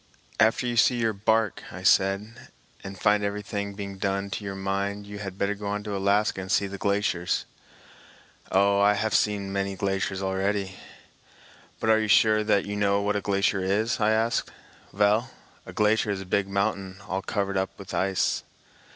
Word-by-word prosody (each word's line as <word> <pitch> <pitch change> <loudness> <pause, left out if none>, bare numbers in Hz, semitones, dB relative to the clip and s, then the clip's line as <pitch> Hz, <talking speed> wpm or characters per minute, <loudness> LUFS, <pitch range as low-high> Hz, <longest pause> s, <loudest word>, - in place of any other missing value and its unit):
"After 115 +4 +3
you 120 -1 -2
see 125 +1 +5
your 115 -2 +1
bark," 110 +1 +1
I - - -9
said, 100 +5 +2 0.4
"and 95 -1 -8
find 105 0 +3
everything 100 0 -3
being 100 -1 -7
done 100 0 -1
to 105 - -4
your 100 -1 -5
mind, 100 +1 -2
you 100 0 -8
had 95 -2 -6
better 100 +1 0
go 105 0 -7
on 105 0 -2
to 105 -1 -4
Alaska 100 0 +1
and 95 +1 -6
see 100 - +3
the 100 0 -7
glaciers." 100 -3 0 1.1
"Oh, 100 +1 +3
I 105 +1 +5
haf 110 +1 -1
seen 100 -2 +1
many 100 0 -1
glaciers 95 0 -2
already." 95 +1 -1 1.1
"But 110 - +2
are 110 - +5
you 110 - -1
sure 110 0 +4
that 105 -2 +2
you 105 - -4
know 100 -1 +2
what 105 0 0
a 105 - 0
glacier 100 0 +1
is?" 105 +6 0
I 105 -1 +3
asked. 110 +2 +1 0.4
"Vell, 105 +4 +2 0.4
a - - -7
glacier 105 0 +2
is 100 -1 -1
a - - -8
big 95 +2 0
mountain 100 -1 -2
all 95 +1 -2
covered 100 -1 -2
up 95 0 0
vith 100 - -10
ice." 95 -1 +1
100 Hz, 185 wpm, -26 LUFS, 95-105 Hz, 1.1 s, see